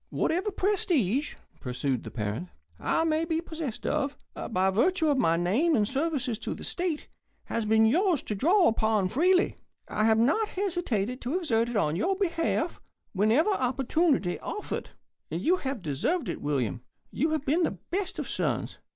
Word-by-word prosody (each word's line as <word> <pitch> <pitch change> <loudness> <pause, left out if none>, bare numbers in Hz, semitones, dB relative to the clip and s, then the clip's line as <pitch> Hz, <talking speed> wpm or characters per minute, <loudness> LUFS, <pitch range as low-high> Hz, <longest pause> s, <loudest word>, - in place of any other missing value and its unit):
"Whatever 365 +6 0
prestige," 315 - +1 0.2
pursued 125 0 -2
the - - -7
parent, 110 - -4 0.3
"I - - +1
may 320 0 +1
be 325 -1 0
possessed 320 -7 -5
of, 290 -2 -1 0.3
by 190 -2 +2
virtue 320 - +2
of 280 -2 +2
my 165 -8 +3
name 230 - +2
and 210 -2 +2
services 270 -5 -1
to - - -4
the - - -10
state, 345 -4 -2 0.4
has 230 - -2
been 220 +1 +4
yours 335 - +3
to - - -3
draw 345 - +4
upon 220 -4 +2
freely. 360 - +3 0.3
I 215 - 0
have 220 0 +4
not 305 - +2
hesitated 260 - -1
to 265 +8 -1
exert 235 -10 +1
it 240 - -5
in 155 -7 +1
your 370 - +1
behalf 340 -3 -1 0.3
whenever 220 - +3
opportunity 265 - +1
offered. 420 - -5 0.4
And 165 - -3
you 345 - +2
have 265 - -4
deserved 160 - -1
it, - - -4
William. 130 -5 -1 0.3
You've 310 +1 0
been 310 +6 +2
the - - 0
best 380 +1 -2
of - - -3
sons. - - -2
275 Hz, 165 wpm, -28 LUFS, 210-340 Hz, 0.4 s, been